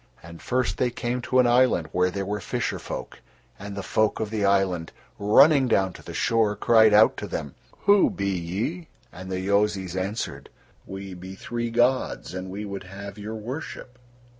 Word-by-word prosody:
And 85 0 -11
first 125 -6 -1
they 125 - +2
came 120 +1 -3
to 130 +1 0
an 125 - +6
island 120 -9 +3
where 90 +2 0
were 105 +2 -2
fisher - - -2
folk; - - -7 0.4
and 100 +1 -7
the 100 - -5
folk 110 +2 +1
of 110 -1 -3
the 110 -2 -1
island, 95 -4 +1 0.3
running 135 +7 +5
down 95 -5 +2
to - - -12
the - - -9
shore 110 -2 +2
cried 110 +1 +5
out 105 +1 +5
to - - -5
them: 70 - -5 0.3
"Who 200 0 +5
be 100 0 -2
ye?" 100 - -3 0.3
And 95 +1 -8
the 95 - -2
Yozis 100 -2 0
answered: 95 +4 -4 0.4
"We 95 0 -7
be 95 +1 -9
three 120 +3 -4
gods, 120 -3 +1
and 95 0 -5
we 100 +3 -5
would 100 -1 -6
have 100 +2 -9
your 110 +2 -6
worship." 125 +2 -7
100 Hz, 180 wpm, -25 LUFS, 95-120 Hz, 0.4 s, an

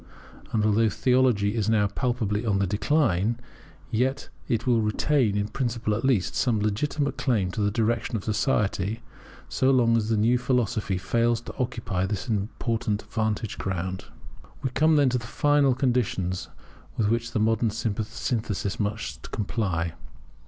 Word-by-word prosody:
And 105 -2 +1
although 110 +1 +3
theology 110 -3 +2
is 110 -2 0
now 110 -2 +3
palpably 110 -1 -1
on 105 -4 +1
the 100 - +2
decline, 110 - +1 0.5
yet 130 +5 0 0.2
it 115 -4 0
will 120 -3 +3
retain, 110 0 +1
in 105 0 0
principle 115 -2 -2
at 110 +4 -2
least, 125 -9 +2
some 115 -4 +1
legitimate 140 +7 -1
claims 100 -8 +1
to 110 - -2
the 100 - +2
direction 115 +1 0
of 100 - -7
society 105 -2 0 0.5
so 130 - +1
long 120 -3 +4
as 110 -1 0
the 110 - +2
new 120 +4 +3
philosophy 120 -6 0
fails 115 +5 +1
to - - -9
occupy 110 -7 -1
this 100 +2 -3
important 110 0 -1
vantage 110 -2 -2
ground. 95 0 -3 0.6
We 130 - -1
come 155 +5 +3
then 145 -3 +4
to 125 0 0
the 120 - -9
final 145 -1 +3
conditions 120 -8 0 0.5
with 110 - +2
which 115 +1 0
the - - +1
modern 110 +1 +2
synthesis 110 -1 -2
must 100 -9 -3
comply. 95 -6 -2
110 Hz, 150 wpm, -26 LUFS, 105-125 Hz, 0.6 s, long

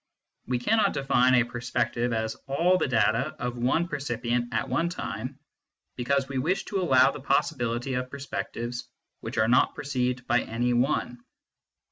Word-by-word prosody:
We 125 0 +1
cannot 215 - +2
define 130 -2 +3
a 125 - +5
perspective 120 0 -2
as 110 -1 -1
all 170 +7 +3
the - - +1
data 115 +3 +1
of 125 0 -4
one 130 +8 +1
percipient 120 -5 -2
at 140 - -1
one 165 +7 0
time, 130 - -5 0.6
because 135 +2 0
we 135 -1 -2
wish 180 +9 0
to 195 -2 -2
allow 130 -7 +5
the - - -8
possibility 125 -2 0
of 125 0 -2
perspectives 125 -3 -5 0.3
which - - -7
are 110 - +3
not 125 - +3
perceived 125 -3 -2
by 120 0 +2
any 120 +2 -1
one. 120 -1 0
125 Hz, 155 wpm, -27 LUFS, 120-140 Hz, 0.6 s, a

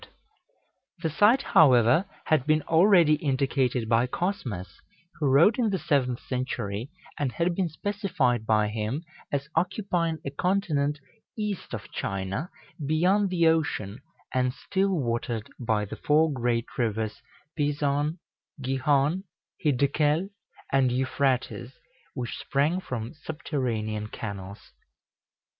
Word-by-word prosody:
The 160 - 0
site, 220 - +4
however, 130 - +5 0.2
had 155 -4 +2
been 155 -1 +3
already 165 -2 +5
indicated 135 -4 0
by 115 +2 +3
Cosmas, 125 - -4 0.4
who 150 - +1
wrote 160 - +5
in 230 -3 +2
the 195 - 0
seventh 130 -7 0
century, 125 -3 -3 0.3
and 140 -4 -1
had 170 +1 +1
been 180 -1 0
specified 155 - -1
by 105 -1 +3
him 110 +8 -3 0.3
as 140 -1 -1
occupying 175 -4 0
a 140 - -3
continent 150 -4 0 0.4
east 210 -3 -3
of - - -9
China, 100 - -3 0.3
beyond 180 +7 +2
the 175 -2 +2
ocean, 145 -10 +1 0.3
and 125 0 +1
still 195 +1 0
watered 120 - -2
by 110 -4 0
the 100 - -8
four 155 +1 +3
great 120 -2 0
rivers 110 -2 -1 0.3
Pison, 145 +1 0 0.4
Gihon, 140 +6 +1 0.4
Hiddekel, 150 +6 +2 0.4
and 135 -2 +4
Euphrates, 130 -1 0 0.4
which 125 -3 -4
sprang 150 +6 +1
from 120 -9 -5
subterranean 120 -9 -3
canals. 100 -2 -7
140 Hz, 115 wpm, -27 LUFS, 120-165 Hz, 0.4 s, however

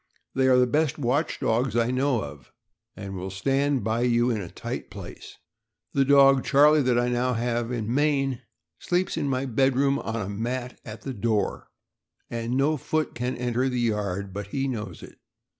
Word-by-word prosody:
They 130 0 +2
are 130 -1 +5
the 125 - +5
best 150 +4 +1
watch 140 +3 0
dogs 115 +1 0
I 120 +1 +2
know 130 -3 +1
of, 70 0 -10 0.4
and 95 -1 -7
will 95 +1 -5
stand 135 +6 0
by 110 +2 0
you 120 0 +2
in 110 -3 -1
a 90 - -7
tight - - -6
place. - - -10 0.6
The 140 - +3
dog 135 -1 +6
Charlie, 150 +2 +5
that 125 -2 +2
I 120 0 +2
have 120 -1 0
now 125 - -2
in 110 +1 -2
Maine, 135 -3 +1 0.4
sleeps 180 +1 0
in 155 -3 -1
my 130 0 0
bed 130 +1 +2
room 140 +1 +2
on 110 - -4
a 95 - -3
mat 120 +5 -4
at 110 0 -9
the 135 - -4
door, 105 -2 -1 0.6
and 115 +2 -2
no 150 +3 +2
foot 155 +3 -1
can 125 +2 -3
enter 125 +1 0
the 125 -1 -2
yard 100 -4 -1
but 100 0 -5
he 135 +6 -2
knows 115 -6 -5
it. - - -13
125 Hz, 190 wpm, -26 LUFS, 115-135 Hz, 0.6 s, dog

